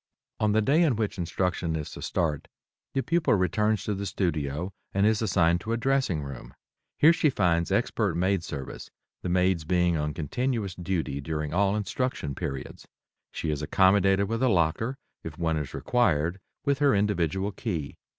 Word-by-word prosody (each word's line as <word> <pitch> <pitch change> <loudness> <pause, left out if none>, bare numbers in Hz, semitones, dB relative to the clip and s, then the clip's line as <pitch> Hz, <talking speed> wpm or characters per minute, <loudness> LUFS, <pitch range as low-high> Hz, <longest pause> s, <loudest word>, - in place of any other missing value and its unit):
On 105 -1 +2
the 110 0 +3
day 145 +8 +3
in 150 -8 +3
which 105 -3 -2
instruction 85 -1 -1
is 75 -2 -4
to - - -9
start, 75 -4 -1 0.5
the 135 - +1
pupil 165 -7 +2
returns 105 +2 +1
to 105 - -1
the 100 0 -3
studio 85 -1 -2 0.2
and 100 +1 +3
is 110 0 +3
assigned 90 -5 +2
to 115 - -2
a - - +1
dressing 130 - +1
room. 70 -3 -9 0.4
Here 160 +3 +7
she 155 - +2
finds 85 - +1
expert - - +1
maid 95 +1 +1
service, 70 -4 -7 0.3
the - - -3
maids 90 -1 +2
being 90 0 +2
on 75 -1 -2
continuous 110 - -2
duty 85 -6 -2
during 75 0 -3
all 100 +2 +2
instruction 105 - -2
periods. 70 0 -6 0.4
She 80 - -3
is 75 -1 -2
accommodated 95 +4 +3
with 115 +3 -2
a 130 - +4
locker, 95 +8 +1 0.3
if 80 -2 -7
one 80 -1 0
is 75 -3 -4
required, 85 -7 +1 0.3
with 140 -1 +1
her 145 -4 +4
individual 100 -1 0
key. 95 -8 -4
95 Hz, 170 wpm, -27 LUFS, 80-110 Hz, 0.5 s, Here